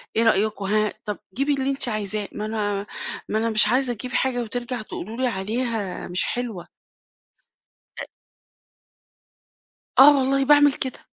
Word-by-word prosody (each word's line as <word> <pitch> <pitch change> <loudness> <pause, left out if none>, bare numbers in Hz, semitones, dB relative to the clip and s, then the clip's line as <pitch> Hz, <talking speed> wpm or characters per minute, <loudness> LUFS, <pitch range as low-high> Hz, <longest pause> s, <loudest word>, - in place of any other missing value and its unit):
إيه 225 - +3
رأيكم 210 -2 +1
ها؟ 215 +1 +1
طَب 210 -1 -3 0.2
جيبي 280 +5 +1
اللي 270 -1 -1
أنتِ 270 -2 -1
عايزاه. 210 -1 -2
ما 210 - -5
أنا 205 -2 -2 0.4
ما 215 - 0
أنا 230 +1 0
مش 215 -1 +4
عايزة 255 -1 +2
أجيب 250 +3 -6
حاجة 255 -1 0
وترجع 245 +1 -4
تقولوا 215 +1 -7
لي 260 0 +1
عليها 220 -1 -2
مش 180 +1 +1
حلوة. 235 -8 -4 1.3
أ - - -5 1.9
آه 280 +1 +9
والله 270 +1 +1
باعمل 290 0 +6
كده. 260 -1 -3
230 Hz, 145 wpm, -23 LUFS, 210-260 Hz, 1.9 s, آه